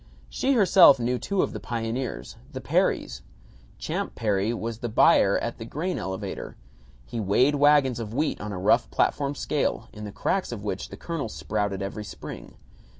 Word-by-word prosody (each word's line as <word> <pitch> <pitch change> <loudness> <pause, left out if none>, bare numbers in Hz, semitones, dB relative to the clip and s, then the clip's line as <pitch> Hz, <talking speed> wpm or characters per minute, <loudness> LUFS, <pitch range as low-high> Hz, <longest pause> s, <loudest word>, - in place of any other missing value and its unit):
She 275 - +1
herself 185 - +7
knew 125 +1 0
two 200 -2 0
of - - -3
the - - -5
pioneers: 115 - -4 0.2
the - - -4
Perrys. - - 0 0.6
Champ - - -4
Perry 105 -1 0
was 115 -1 -4
the 120 - -3
buyer 100 -3 +5
at 120 - -4
the - - -5
grain 170 +9 -3
elevator. 95 0 -5 0.5
He 115 - -5
weighed 110 +8 +3
wagons 145 -4 +4
of 110 -2 -5
wheat 150 +7 -1
on 105 - -5
a 95 - -4
rough 90 - +2
platform 140 - 0
scale, 145 0 -1
in 105 - -9
the 105 - -6
cracks 190 - -1
of 110 -4 -6
which 100 -3 -4
the - - -9
kernels 160 -10 -4
sprouted 100 -2 -2
every 100 +2 -5
spring. 105 - -9
115 Hz, 175 wpm, -26 LUFS, 105-145 Hz, 0.6 s, herself